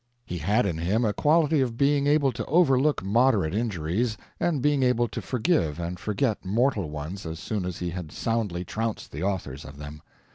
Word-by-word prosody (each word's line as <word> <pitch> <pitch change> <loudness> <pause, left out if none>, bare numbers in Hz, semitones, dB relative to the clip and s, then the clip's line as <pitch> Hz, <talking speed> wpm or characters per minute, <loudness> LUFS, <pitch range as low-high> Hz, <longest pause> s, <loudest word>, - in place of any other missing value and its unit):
He 90 - -5
had 105 +9 +2
in 85 -5 -2
him 100 +8 +1
a 105 - +1
quality 155 +1 +3
of 120 -3 -1
being 140 +1 +3
able 145 -2 +3
to - - -4
overlook 145 - +3
moderate 105 -4 +3
injuries, 110 +1 -1 0.2
and 170 -5 +1
being 145 +1 +2
able 125 -2 +3
to - - -5
forgive 125 - 0
and 85 +1 -4
forget 110 +1 -1
mortal 105 - +1
ones 75 +6 -6
as 80 -1 -5
soon 100 +2 -3
as 90 -1 -4
he 90 -1 -3
had 85 -3 -6
soundly 105 -6 -2
trounced 110 +2 -3
the 75 - -6
authors 90 -8 -3
of 75 -1 -11
them. 75 +1 -9
105 Hz, 190 wpm, -26 LUFS, 85-130 Hz, 0.2 s, quality